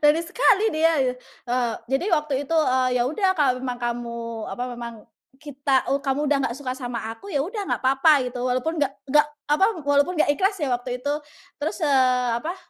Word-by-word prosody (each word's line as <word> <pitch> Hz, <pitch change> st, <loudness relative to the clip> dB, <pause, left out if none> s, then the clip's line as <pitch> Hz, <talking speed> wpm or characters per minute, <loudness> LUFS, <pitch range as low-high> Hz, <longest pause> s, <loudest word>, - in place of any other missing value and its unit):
berani 300 Hz, +3 st, +4 dB
sekali 410 Hz, +2 st, +3 dB
dia. 325 Hz, +1 st, +3 dB
Eee, 250 Hz, -1 st, -2 dB, 0.2 s
jadi 270 Hz, +7 st, +1 dB
waktu 300 Hz, -1 st, -3 dB
itu, 330 Hz, -, 0 dB
eee, 255 Hz, -4 st, +3 dB
"Ya 240 Hz, -, +3 dB
udah 385 Hz, +3 st, +1 dB
kalau 285 Hz, -5 st, +3 dB
memang 250 Hz, -2 st, -3 dB
kamu 240 Hz, 0 st, -3 dB, 0.3 s
apa, 245 Hz, -, -5 dB
memang 235 Hz, -1 st, -6 dB, 0.4 s
kita 275 Hz, -2 st, 0 dB
eee, 275 Hz, -, +1 dB
kamu 275 Hz, -1 st, -1 dB
udah 290 Hz, -, +4 dB
nggak 235 Hz, -, -6 dB
suka 265 Hz, -3 st, -4 dB
sama 245 Hz, -2 st, -5 dB, 0.2 s
aku, 390 Hz, -, -12 dB
ya 285 Hz, -5 st, 0 dB
udah 415 Hz, +4 st, -5 dB
nggak -, -, -1 dB
papa," 270 Hz, +1 st, +4 dB
gitu, 250 Hz, 0 st, -5 dB
walaupun 255 Hz, +6 st, -1 dB
nggak 275 Hz, -2 st, +1 dB, 0.2 s
nggak 300 Hz, +1 st, +5 dB, 0.3 s
apa, 305 Hz, +6 st, +4 dB, 0.2 s
walaupun 285 Hz, +5 st, +2 dB
nggak 305 Hz, -, +3 dB
ikhlas 385 Hz, +7 st, 0 dB
ya 265 Hz, -4 st, 0 dB
waktu 245 Hz, +1 st, -2 dB
itu. 285 Hz, -, +1 dB, 0.5 s
Terus, 305 Hz, +3 st, -2 dB
eee, 255 Hz, -3 st, +3 dB
apa 345 Hz, +4 st, -4 dB
275 Hz, 195 wpm, -24 LUFS, 250-310 Hz, 0.5 s, nggak